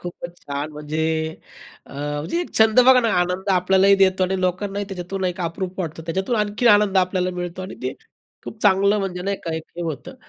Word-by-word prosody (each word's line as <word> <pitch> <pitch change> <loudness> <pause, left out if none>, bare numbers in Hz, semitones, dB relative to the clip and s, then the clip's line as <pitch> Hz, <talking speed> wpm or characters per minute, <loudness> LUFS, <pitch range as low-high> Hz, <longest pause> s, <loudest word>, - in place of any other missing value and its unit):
खूपच 175 0 -8
छान! 145 +2 -4
म्हणजे 150 +1 -4 0.9
अ, - - -14
म्हणजे 145 - -3
छंद 220 +2 +6
बघा 260 -1 +7
ना, 230 - +1
आनंद 180 +2 -2
आपल्यालाही 190 +1 +4
देतो 190 -1 +3
आणि 190 +1 -1
लोकांनाही 195 +3 -1
त्याच्यातून 190 0 -5
एक 180 +1 -2
अप्रूप 180 +2 -4
वाटतं. 160 -2 -5
त्याच्यातून 190 +8 -1
आणखीन 210 +3 +1
आनंद 205 -2 +4
आपल्याला 185 0 +1
मिळतो 175 +1 -5
आणि 190 - -7
ते - - -2 0.5
खूप 220 - -9
चांगलं, 200 +1 +4
म्हणजे 180 -2 -3
नाही 200 +1 -1
का, 165 - -2
एक 160 - -5
हे 175 - -4
होतं. 160 -6 -5
185 Hz, 185 wpm, -22 LUFS, 175-200 Hz, 0.9 s, बघा